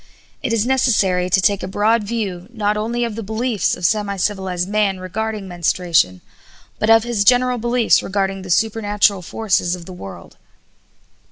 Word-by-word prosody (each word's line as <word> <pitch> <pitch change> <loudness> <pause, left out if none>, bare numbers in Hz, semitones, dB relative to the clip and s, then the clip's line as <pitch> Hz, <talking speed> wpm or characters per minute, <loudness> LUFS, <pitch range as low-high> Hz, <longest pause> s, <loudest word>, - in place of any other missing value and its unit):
It - - -2
is 230 -1 +1
necessary 205 -9 +2
to 190 - +3
take 200 +1 +2
a - - -4
broad 215 +3 +1
view, 200 -5 -4
not 210 -3 -1
only 230 +3 -2
of 230 -2 -2
the 225 - -5
beliefs 220 +1 -1
of 180 - -4
semi 205 0 0
civilized 185 -2 -2
man 205 -2 0
regarding 210 +2 -4
menstruation, 170 - +1 0.6
but 215 - 0
of 225 0 +6
his 235 -4 0
general 250 +2 +3
beliefs 240 0 +2
regarding 195 0 -2
the 185 - -10
supernatural 205 -1 +1
forces 185 -2 -1
of 175 -2 -11
the 185 - -9
world. 95 - -11
205 Hz, 165 wpm, -19 LUFS, 185-225 Hz, 0.6 s, of